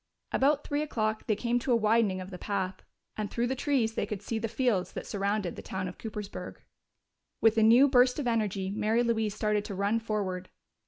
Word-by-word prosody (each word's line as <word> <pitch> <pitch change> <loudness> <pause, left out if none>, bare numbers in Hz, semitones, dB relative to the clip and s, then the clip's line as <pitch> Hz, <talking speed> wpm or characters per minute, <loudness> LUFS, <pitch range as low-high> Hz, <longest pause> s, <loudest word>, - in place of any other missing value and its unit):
About 285 +2 +2
three 290 +1 -1
o'clock 215 -7 -2
they 215 - +2
came 240 +3 0
to 250 - -2
a - - +6
widening 215 -3 +2
of 185 +2 -8
the 180 - -8
path, 190 -2 -3 0.3
and 210 -1 -3
through 235 - -1
the 250 - 0
trees 255 -5 +1
they - - -2
could 210 -1 -5
see 225 +1 -2
the 225 - -2
fields 220 -6 0
that - - -5
surrounded 200 -2 -1
the - - -7
town 190 -1 -4
of 180 - -9
Coopersburg. 210 -2 -6 0.8
With 225 0 +4
a 225 - +3
new 235 +6 +7
burst 250 -2 +4
of 290 - -2
energy 210 -5 0
Mary 220 +3 +1
Louise 220 -3 0
started 210 -1 0
to 200 - -5
run 200 +4 +1
forward. 195 -5 -3
215 Hz, 210 wpm, -29 LUFS, 200-235 Hz, 0.8 s, new